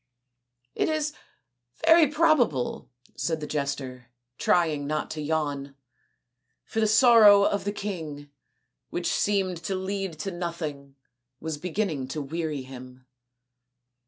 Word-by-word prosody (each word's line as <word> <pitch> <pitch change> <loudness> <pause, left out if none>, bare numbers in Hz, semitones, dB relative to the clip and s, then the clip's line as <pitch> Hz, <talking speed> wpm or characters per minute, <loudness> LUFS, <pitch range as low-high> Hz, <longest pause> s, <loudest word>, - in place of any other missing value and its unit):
" - - -56 0.3
It - - 0
is 305 -1 -1 0.7
very 325 -1 +7
probable," 275 - +1 0.3
said 160 -1 -1
the 150 - -5
jester, 140 -4 -4 0.3
trying 155 -5 +2
not 155 +1 -2
to 155 - -4
yawn, 145 -3 -2 0.9
for 225 - -3
the 220 - +3
sorrow 215 -2 +7
of 200 0 0
the 205 - 0
king, 160 -9 -6 0.6
which 175 - -4
seemed 195 -3 +1
to 195 - -1
lead 190 -2 -3
to 195 - -3
nothing, 155 -6 -5 0.4
was 160 -2 -4
beginning 175 -6 -2
to 150 +3 -4
weary 155 -1 -3
him. 130 -1 -12
160 Hz, 125 wpm, -26 LUFS, 145-200 Hz, 0.9 s, very